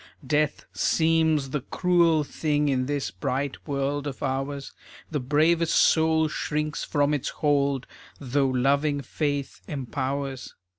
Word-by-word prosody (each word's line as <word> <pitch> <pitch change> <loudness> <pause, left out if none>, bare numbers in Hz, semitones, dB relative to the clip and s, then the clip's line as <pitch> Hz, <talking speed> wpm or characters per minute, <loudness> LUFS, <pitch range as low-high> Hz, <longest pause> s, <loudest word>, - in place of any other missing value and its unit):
Death 150 +2 0
seems 160 -4 +2
the 150 - -1
cruel 170 +1 +2
thing 150 0 0
In 130 -2 0
this 140 -8 -2
bright 130 - -3
world 140 0 -1
of 135 - -6
ours. 135 +1 -3 0.4
The 150 - 0
bravest 155 +5 +2
soul 160 0 +4
shrinks 150 0 -2
from 145 -1 +1
its 145 - -1
hold 140 -3 +1 0.3
Though 135 0 +1
loving 140 +3 +1
faith 145 +1 -3
empowers. 135 -1 -4
145 Hz, 120 wpm, -26 LUFS, 135-155 Hz, 0.4 s, soul